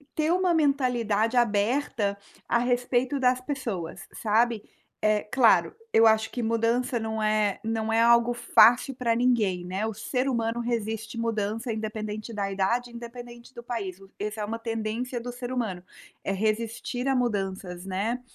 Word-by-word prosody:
ter 310 +1 +1
uma 365 -1 +2
mentalidade 250 -7 +1
aberta 210 -2 +1 0.3
a - - +3
respeito 245 +2 +1
das 250 0 +3
pessoas, 235 - -5
sabe. 225 0 +1 0.4
É 215 -1 +2
claro, 230 +1 +4 0.2
eu 225 - +6
acho 220 0 +4
que 245 - -3
mudança 230 +2 +1
não 220 0 -3
é 215 -2 +1
não 225 0 -1
é 225 - +4
algo 235 +1 +5
fácil 240 +2 +5
pra 235 -3 +1
ninguém, 225 -7 +2
né, 190 +4 -2
o 220 - -3
ser 250 +5 -2
humano 230 -1 -1
resiste 225 -1 -3
mudança 225 +1 -2
independente 215 0 -4
da 200 -2 -2
idade, 235 +6 0
independente 240 +1 -10
do 235 - -9
país, 210 -7 -4 0.2
esse 210 +1 -3
é 210 - -1
uma 225 +2 -4
tendência 225 +2 -3
do 245 +1 -5
ser 245 +1 -6
humano, 215 -8 -2 0.4
é 195 - -1
resistir 225 +4 -2
a 270 - +2
mudanças, 195 -6 -2
né. 205 +6 -2
230 Hz, 155 wpm, -27 LUFS, 215-245 Hz, 0.4 s, eu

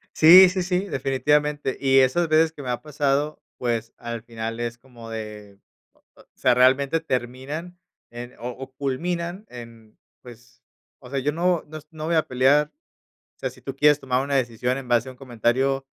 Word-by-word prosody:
Sí, 180 +4 +9
sí, 185 0 -2
sí, 180 +2 -1
definitivamente. 145 0 0
Y 135 -1 +4
esas 135 +6 +3
veces 160 +1 +3
que 145 - -10
me 125 - -4
ha 120 0 -3
pasado, 145 +1 -1 0.2
pues, 115 -2 -2
al 120 -1 -6
final 115 -1 -6
es 120 0 -4
como 120 -2 -13
de, 105 -2 -8 0.3
o - - -33 0.2
o - - -19
sea, - - +2
realmente 135 +5 +3
terminan 140 +5 -4 0.3
en 120 +1 -9
o 120 +1 -5
o 130 +2 -10
culminan 170 +8 -3
en 115 -3 -13 0.2
pues, 120 -1 -16 0.4
o 125 - -13
sea, 140 - -2
yo 150 +3 -1
no 175 +1 0
nos 155 -1 -10
no 155 -1 -6
voy 165 0 +1
a 160 - +2
pelear, 140 +4 +2 0.6
o - - -67
sea, - - -2
si - - -17
tú 135 -1 -7
quieres 150 +1 +4
tomar 130 -1 0
una 140 0 -2
decisión 125 0 -1
en 130 -2 -9
base 120 +1 +2
a - - -8
un 125 - -21
comentario, 130 +2 0
135 Hz, 190 wpm, -23 LUFS, 120-150 Hz, 0.6 s, Sí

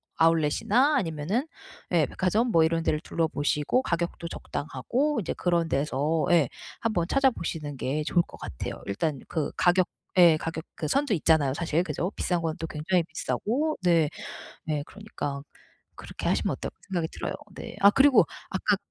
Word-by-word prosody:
아울렛이나 165 - +3
아니면은 165 - -1 0.5
예 165 -4 +4
백화점 215 - 0
뭐 165 -1 +5
이런 165 0 +1
데를 155 -2 +1
둘러보시고 150 - 0
가격도 170 -4 -2
적당하고 235 - -2
이제 180 - -2
그런 170 -2 +1
데서 150 +3 0
예 165 -6 +5 0.3
한번 215 -7 0
찾아보시는 170 - 0
게 150 +5 -1
좋을 175 - +3
것 - - -13
같아요. - - -6
일단 140 +8 -1
그 155 -4 -2
가격 180 0 +4 0.3
예 170 -3 +7
가격 165 0 -4
그 155 - -3
선도 275 - +1
있잖아요. 155 -5 +3
사실. 165 +1 0
그죠? 175 +3 -2
비싼 175 -2 0
건 160 -1 -2
또 165 - -4
굉장히 165 +4 0
비싸고. 285 - -1
네. 165 -4 +4 0.6
네. 150 -2 -1
그러니까 195 -9 -6 0.6
그렇게 - - -7
하시면 - - +1
어떨까 - - -6
생각이 175 -4 -1
들어요. - - -4 0.2
네. - - -7
아 200 - +8
그리고 270 +4 +6 0.2
아까 - - +1
165 Hz, 345 characters per minute, -27 LUFS, 155-195 Hz, 0.6 s, 아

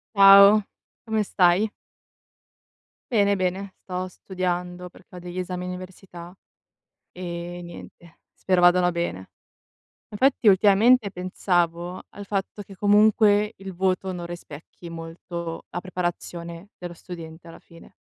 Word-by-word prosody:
Ciao! 200 +1 +8 0.4
Come 220 -2 0
stai? 190 +2 +2 1.4
Bene, 200 -3 +3
bene 185 +1 -3
sto 185 0 -4
studiando, 180 -1 -4
perché 180 0 -18
ho - - -8
degli 175 +1 -7
esami 180 0 -4
università, 180 -1 -9 0.8
ehm, 175 0 -7
niente 170 -1 -13
spero 185 -1 0
vadano 175 0 +5
bene. 170 - -4 0.8
Infatti, 250 +1 +2
ultimamente 205 +3 +4
pensavo 180 -1 -2
al 205 0 -11
fatto 200 +1 -3
che 195 0 -14
comunque 210 +1 +4
il 195 -1 -8
voto 190 +1 0
non 175 -2 -6
rispecchi 170 0 -11
molto 165 0 -7
la 175 - -4
preparazione 175 0 -5
dello 175 -1 -8
studente, 165 -1 -10
alla 165 - -12
fine. 170 -1 -17
180 Hz, 115 wpm, -24 LUFS, 175-195 Hz, 1.4 s, Ciao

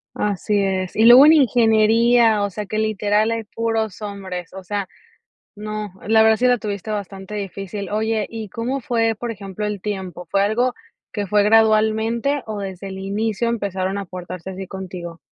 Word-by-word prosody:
Así 205 0 0
es, 190 -2 -2
y 220 - +4
luego 245 +4 +10
en 310 - +8
ingeniería, 230 -3 +4
o 200 - -2
sea, 210 +1 -6
que 215 - -3
literal 215 0 +1
hay 230 -1 -3
puros 225 -2 -2
hombres, 190 -4 -6
o 190 - -8
sea, 200 +1 -3 0.7
no, 210 -1 -5 0.2
la 220 0 +5
verdad 220 0 +4
sí 250 - +2
la 250 0 +4
tuviste 210 -2 -5
bastante 195 -1 -5
difícil. 200 -1 -5
Oye 220 0 0
y, 225 -2 -6
¿cómo 245 +7 -3
fue 225 -2 0
por 240 +1 -4
ejemplo 200 -1 -5
el 205 -2 -4
tiempo? 190 -4 -5
¿Fue 195 - +2
algo 225 +5 +1 0.4
que 205 -4 -3
fue 205 +2 +3
gradualmente, 220 +5 +2
o, 215 -2 -5
desde 195 -1 -6
el 190 0 -7
inicio 210 +3 -1
empezaron 195 -3 -2
a 200 - -5
portarse 180 0 -8
así 190 0 -7
contigo? 180 -3 -7
210 Hz, 175 wpm, -21 LUFS, 195-225 Hz, 0.7 s, luego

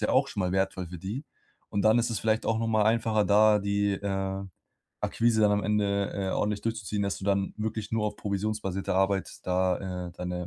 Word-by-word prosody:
ja - - +2
auch 135 +2 +3
schon 105 - -4
mal 90 -1 0
wertvoll 95 -1 0
für 90 0 -8
die, 110 - -5 0.4
und 100 - -1
dann 110 +3 +5
ist 120 - +1
es 110 - -1
vielleicht 110 0 +1
auch 115 0 +1
noch 115 - -1
mal 110 -2 +3
einfacher, 110 -1 +2
da 105 +1 +5
die, 100 0 +1
äh, 95 0 -2 0.6
Akquise 115 -1 +2
dann 105 -1 +5
am 105 0 +1
Ende, 100 -2 +1
äh, 95 -1 -2
ordentlich 105 0 -1
durchzuziehen, 110 -3 -2
dass 100 -1 -1
du 95 - -8
dann 100 -1 +1
wirklich 110 0 -3
nur 110 -1 +1
auf 105 - -4
provisionsbasierte 100 -2 -2
Arbeit 95 0 +1
da, 90 0 0
äh, - - -11
deine 90 0 -4
100 Hz, 210 wpm, -28 LUFS, 95-110 Hz, 0.6 s, dann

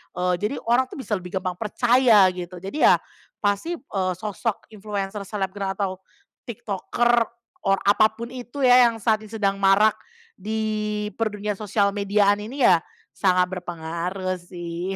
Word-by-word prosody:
eee, 180 0 +1
jadi 210 +7 -2
orang 245 +3 +2
tuh - - -11
bisa 265 - -9
lebih 180 +2 -8
gampang 180 -1 -4
percaya 235 -1 +4
gitu. 180 0 -7
Jadi 195 +11 +2
ya - - +7 0.5
pasti, 205 - 0
eee, 190 - -3
sosok 215 +1 -3
influencer, 205 -1 -4
selebgram, 195 -1 -3
atau 190 -2 -3 0.5
tiktoker, 235 +2 0 0.4
or 195 0 +4
apa 205 +2 +5
pun 235 +1 -7
itu 255 +2 -6
ya, 250 -1 +7
yang 230 - -6
saat 215 0 +2
ini - - -13
sedang 200 -2 0
marak 200 +2 +5 0.5
di 215 0 -2
dunia 210 -2 -2
per 215 - -7
sosial 200 0 +2
mediaan 205 0 +2
ini 250 +6 -4
ya, 175 -3 +6 0.4
sangat 180 -1 +1
berpengaruh 175 +2 -4
sih, 175 +1 -5
205 Hz, 155 wpm, -23 LUFS, 190-220 Hz, 0.5 s, ya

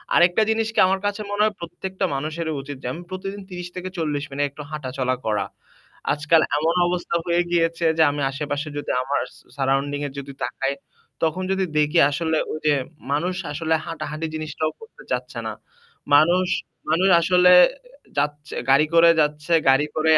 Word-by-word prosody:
আরেকটা 175 +4 +5
জিনিস 220 0 +1
কি - - +2
আমার 190 +1 +1
কাছে 205 +1 -1
মনে 205 0 0
হয় 215 -1 +2
প্রত্যেকটা 185 +3 -4
মানুষেরই 155 +3 -3
উচিত 140 0 -8
যে - - -3
আমি 170 - -7
প্রতিদিন 195 +2 -5
৩০ 180 -1 -6
থেকে 185 0 -5
৪০ 150 -3 -1
মিনিট 145 +1 0
একটু 150 +2 -9
হাঁটাচলা 130 -3 -2
করা। 105 -3 0 0.7
আজকাল 150 +2 +3 0.2
এমন 160 +3 +1
অবস্থা 175 -1 -2
হয়ে 175 0 +2
গিয়েছে 170 0 +1
যে 160 - +6
আমি 145 0 -3
আশে-পাশে 145 +1 -3
যদি 145 - -3
আমার 140 +2 0 0.2
সা - - -20
surrounding 140 +1 0
এ - - -6
যদি 140 0 -8
তাকাই 135 +2 -1 0.5
তখন 165 +3 0
যদি 190 0 +1
দেখি 150 +3 +3
আসলে 160 +2 0
ওই 155 - -4
যে 150 - +5 0.4
মানুষ 175 +6 0 0.2
আসলে 160 +2 -1
হাঁটাহাঁটি 155 -1 -4
জিনিসটাও 155 0 -2
করতে 475 +3 -14
চাচ্ছে - - -3
না। - - -3 0.6
মানুষ 175 +5 +4 0.4
মানুষ 175 +5 +3
আসলে 180 +1 +5 0.7
যাচ্ছে 145 0 -2 0.2
গাড়ি 140 +3 +6
করে 170 0 +7
যাচ্ছে, 150 +2 -1 0.2
গাড়ি 135 +2 +4
করেই 155 0 +4
155 Hz, 170 wpm, -23 LUFS, 145-175 Hz, 0.7 s, করে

